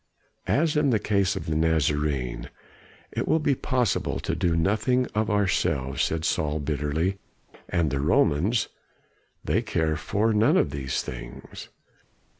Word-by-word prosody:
"As 155 +2 +2
in 150 -2 +3
the 115 - +3
case 100 -2 +1
of - - -5
the 80 - -2
Nazarene, 75 -6 0 0.6
it - - -3
will - - +3
be 150 -3 +2
possible 125 -4 0
to - - -2
do 85 -1 +1
nothing 110 +8 +2
of 110 +1 0
ourselves," 95 -10 0
said 80 0 0
Saul 75 0 0
bitterly. 75 +6 -1 0.5
"And 85 -4 +1
the 70 - -1
Romans 85 - +2 0.8
they - - +1
care 80 -1 0
for 100 +8 0
none 105 +1 +4
of - - +2
these 65 -2 -2
things." - - -9
80 Hz, 140 wpm, -26 LUFS, 75-105 Hz, 0.8 s, none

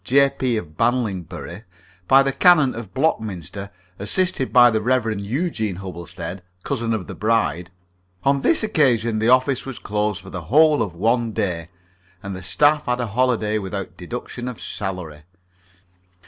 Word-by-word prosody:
J.P., 135 -2 +2
of 75 -7 -7
Banlingbury, 100 -6 -2 0.5
by 135 +1 +6
the 135 - 0
Canon 155 -3 +5
of 115 -4 -8
Blockminster, 100 - -2 0.3
assisted 135 - 0
by 120 -1 +7
the 110 0 0
Rev. 115 -3 0
Eugene 110 - -2
Hubblestead, 90 0 -7 0.2
cousin 115 -4 -2
of 100 -5 -4
the - - -8
bride 90 -7 0 0.5
on 140 0 +2
this 320 - +2
occasion 120 - +2
the 110 +2 +2
office 130 +1 +3
was 135 -4 -7
closed 105 -1 -2
for 95 - -11
the 90 -3 -6
whole 150 - +4
of 95 -6 -3
one 115 +4 +1
day, 90 -7 -2 0.6
and 100 -1 -5
the 95 - -7
staff 145 +11 +2
had 125 0 0
a 125 - 0
holiday 110 -1 0
without 95 -2 -5
deduction 120 +6 -6
of 125 -3 -6
salary. 90 -7 -5
110 Hz, 150 wpm, -22 LUFS, 95-130 Hz, 0.6 s, by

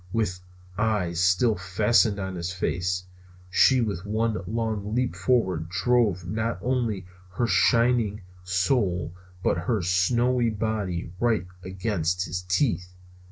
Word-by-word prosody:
With 100 -5 -1 0.4
eyes 105 -6 0
still 90 +6 +3
fastened 105 +3 +2
on 95 -1 -4
his 85 0 -4
face, 90 0 -1 0.5
she 130 +6 +5
with 100 -6 -2
one 110 +2 0
long 110 -1 -2
leap 125 0 0
forward 95 -10 +1
drove 100 -2 +1
not 110 +4 -2
only 115 -7 -1 0.3
her 120 +6 0
shining 115 -3 +2 0.2
soul 90 - 0 0.3
but 85 - +1
her 100 +2 -1
snowy 120 +7 +2
body 105 -6 -2
right 115 -6 +1 0.2
against 90 -2 -1
his 90 +2 -4
teeth. 90 -1 -1
100 Hz, 120 wpm, -26 LUFS, 90-115 Hz, 0.5 s, she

